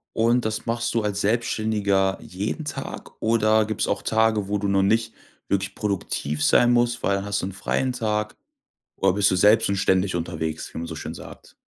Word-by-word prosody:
Und 120 +2 +2
das 110 0 -2
machst 120 0 -1
du 115 - +1
als 100 -1 -1
Selbstständiger 105 -3 +1
jeden 105 - -4
Tag 145 - -6
oder 110 -1 +3
gibt's 110 0 -2
auch - - -1
Tage, 110 -2 +1
wo 105 +1 0
du 100 0 -2
noch 100 0 +2
nicht 115 +3 +1 0.3
wirklich 100 0 -1
produktiv 80 -7 -2
sein 120 +10 +5
musst, 120 0 +1
weil 100 - +2
dann 100 - -5
hast 100 0 -1
du - - -3
'n 95 - -5
freien 125 +6 -1
Tag 105 -3 -2 0.6
oder 95 -1 +2
bist 100 0 +3
du 95 - +1
selbst 105 +4 +5
und 100 - 0
ständig 95 -1 +1
unterwegs, 80 -2 -4
wie - - -5
man 85 - -4
so 80 -1 -7
schön - - -6
sagt. - - -12
105 Hz, 200 wpm, -24 LUFS, 95-110 Hz, 0.6 s, sein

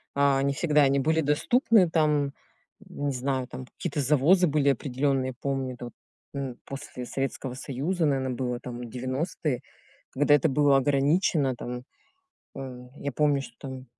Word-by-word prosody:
а, 140 -1 +3
не 140 0 +1
всегда 150 +1 +3
они 140 0 +4
были 160 +4 +2
доступны. 185 - +3
Там 150 -3 +2 0.5
не 145 -1 -4
знаю, 130 0 -1
там 130 - -8
какие-то 150 - -3
завозы 155 +7 +4
были 145 -2 +2
определенные, 135 -1 0
я - - -6
помню 135 -2 -2
это 120 - -8
вот, 120 - -9 0.4
м, 135 -3 -4
после 135 -2 -7
Советского 135 0 -3
Союза, 145 +7 -2
наверно, 135 -3 +1
было 125 -1 -2
там 120 -1 -7
90, 130 +2 -2 0.5
когда 145 +2 +3
это 145 +1 +4
было 140 0 +4
ограничено 140 0 +2
там. 125 +1 -6 0.7
А 125 -2 -8
я 140 - -3
помню, 145 0 +2
что - - -11
там 130 -2 -7
140 Hz, 155 wpm, -27 LUFS, 130-150 Hz, 0.7 s, они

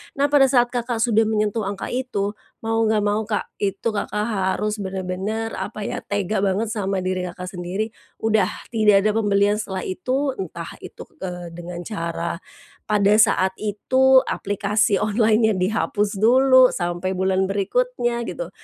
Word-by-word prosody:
Nah, 285 +1 +1
pada 275 -2 +6
saat 245 -2 +3
Kakak 240 -2 -1
sudah 225 -2 +3
menyentuh 215 -1 0
angka 200 0 -4
itu, 240 -6 -2 0.3
mau 225 0 0
enggak 215 -1 +2
mau 205 +1 +1
Kak, 210 -2 -2
itu 200 +2 -1
Kakak 210 0 -2
harus 210 0 -1
benar-benar, 190 +3 -3
apa 215 -1 -5
ya, - - -3
tega 205 0 -2
banget 200 +3 0
sama 195 -3 -2
diri 185 0 -2
Kakak 180 +1 -7
sendiri, 195 +5 -3 0.3
"Udah, 215 -4 +3 0.2
tidak 210 -4 +4
ada 215 - +3
pembelian 205 -1 +2
setelah 190 -3 -4
itu." 265 +8 -1
Entah 170 -2 -6
itu, - - -10 0.2
eee, 175 -2 -6
dengan 175 +1 -7
cara 170 -4 -4 0.5
pada 205 -1 +3
saat 190 -4 +3
itu 260 +6 +3
aplikasi 205 +1 0
online-nya 215 +1 +2
dihapus 205 +2 0
dulu 255 +4 +5
sampai 175 +1 -2
bulan 190 0 +1
berikutnya 240 - -1
gitu - - -5
210 Hz, 150 wpm, -22 LUFS, 190-225 Hz, 0.5 s, pada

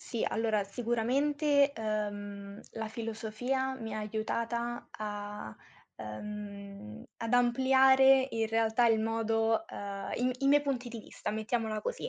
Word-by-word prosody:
Sì, 235 - -3
allora 220 -2 +1
sicuramente, 275 +7 +2
ehm, 205 -2 -4
la 225 -1 -3
filosofia 230 +4 -2
mi 225 -4 -6
ha 215 - -3
aiutata 230 +3 -2
a 205 - -6 0.4
ehm, 200 - -7
ad 230 +1 -4
ampliare 265 +2 +5
in 225 -1 0
realtà 225 +1 +2
il 225 -1 +4
modo 225 +4 +1
ehm, 200 -5 -6
i - - -2
m - - +2
i 275 - 0
miei 290 +1 +5
punti 260 -3 -2
di 235 -1 -7
vista, 210 - -5
mettiamola 220 0 -1
così. 485 - -3
225 Hz, 135 wpm, -31 LUFS, 210-245 Hz, 0.4 s, ampliare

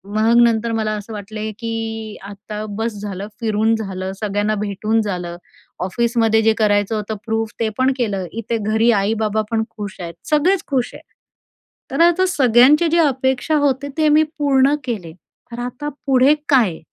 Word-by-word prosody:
मग 225 +2 +4
नंतर 230 0 +2
मला 220 -1 -1
असं 210 +2 -7
वाटले, 215 +1 -5
की 225 -2 -4
आता 210 +2 -7
बस 225 0 -2
झालं, 200 -1 -5
फिरून 220 0 +1
झालं, 190 -3 -4
सगळ्यांना 210 +1 0
भेटून 210 +2 -1
झालं. 180 -4 -4 0.5
ऑफिसमध्ये 225 +3 +1
जे 225 0 +3
करायचं 205 0 +2
होतं 215 0 -3
प्रूफ 225 -1 -1
ते 225 -1 +1
पण 260 +1 +3
केलं. 205 -7 -1
इथे 230 +1 -3
घरी 220 +3 +2
आई-बाबा 215 +1 +1
पण 225 -1 +1
खुश 205 -3 -8
आहे. 170 -1 -5 0.2
सगळेच 340 +5 +2
खुश 255 -4 -1
आहेत, - - -12 0.9
तर - - 0
आता 345 +2 +4
सगळ्यांच्या 275 +1 +5
जे 340 - +3
अपेक्षा 265 0 +1
होती 285 -1 +1
ते 310 -1 +3
मी 305 +1 +5
पूर्ण 275 -1 +3
केले. 215 -10 -4 0.4
तर 235 - -6
आता 295 +4 -5 0.2
पुढे 265 +1 +5 0.2
काय? 225 - +3
225 Hz, 160 wpm, -19 LUFS, 210-255 Hz, 0.9 s, सगळ्यांच्या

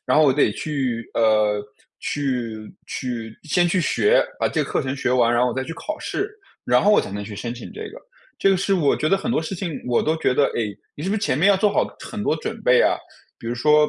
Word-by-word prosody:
然 - - +3
后 155 - +6
我 135 - +5
得 145 - +3
去， 130 -6 -3
呃， 110 -2 +3 0.4
去 120 -6 -3
去 115 -3 -5
先 175 +3 +2
去 180 +1 +1
学， 430 - +3
把 - - +1
这 - - 0
个 - - -6
课 - - +1
程 135 -1 -2
学 140 - -1
完， 120 -2 +4
然 120 0 +3
后 125 - +3
我 120 - -3
再 130 - -2
去 165 - -6
考 310 - -5
试， 400 +2 -3 0.3
然 - - +4
后 210 - +5
我 - - +6
才 - - -6
能 100 +1 -4
去 105 0 -8
申 115 +3 -4
请 125 - -9
这 435 - -7
个。 - - -11 0.4
这 195 - +4
个 195 - +4
是 195 +1 +1
我 155 -7 +3
觉 155 - 0
得 195 - +4
很 235 +5 -2
多 230 - +2
事 165 +4 -4
情 175 -2 -4 0.2
我 120 - +2
都 155 - +1
觉 130 - +1
得， 140 - +4
诶， 105 -4 -3 0.2
你 145 - -8
是 185 - -2
不 210 - +1
是 220 - -4
前 130 -9 +1
面 185 +6 +5
要 200 - +5
做 205 +1 +2
好 - - +2
很 210 -1 -6
多 160 - +1
准 - - -5
备 125 0 +5
啊？ - - +4 0.4
比 - - -10
如 120 - -1
说， 150 +4 +4
140 Hz, 290 characters per minute, -22 LUFS, 120-185 Hz, 0.4 s, 后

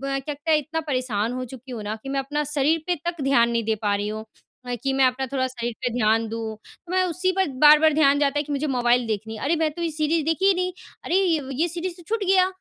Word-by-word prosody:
क्या 275 0 -1 0.2
लगता 295 +3 -4
है 310 - +5
इतना 315 +2 -3
परेशान 255 -7 -1
हो 255 0 -4
चुकी 255 +1 -10
हूँ 230 -3 -5
ना 210 +1 -3
कि 270 - -8
मैं 275 0 0
अपना 295 +2 -2
शरीर 305 +3 +2
पे 360 - +1
तक 340 -3 -4
ध्यान 240 -4 +3
नहीं 230 -1 0
दे 220 0 +1
पा 205 -1 +1
रही 205 +1 -2
हूँ। 215 +1 -5 0.6
कि 270 -1 0
मैं 265 0 +3
अपना 260 +1 -1
थोड़ा 260 -1 +1
शरीर 240 -2 -4
पे 245 - 0
ध्यान 225 0 +2
दूँ। 225 -1 -4
तो 335 +10 -18
मैं 370 0 +3
उसी 365 +2 0
पर 380 -4 +2 0.2
बार-बार 305 +1 +7
ध्यान 285 -2 +4
जाता 285 0 +1
है 290 - +1
कि 295 0 -6
मुझे 285 +2 -1
मोबाइल 245 -3 +2
देखनी 220 +1 -4
है। - - -9
अरे 320 +4 +2
मैं 315 -1 +1
तो 340 - -6
ये 335 - 0
सीरीज़ 310 0 0
देखी 325 +4 +1
ही 395 - +5
नहीं। 365 0 -1 0.3
अरे 350 - +1 0.5
ये 345 - +2
सीरीज़ 350 +1 -4
तो 350 - -13
छूट 440 -2 -1
गया। 370 -1 +4
275 Hz, 265 wpm, -24 LUFS, 240-320 Hz, 0.6 s, बार-बार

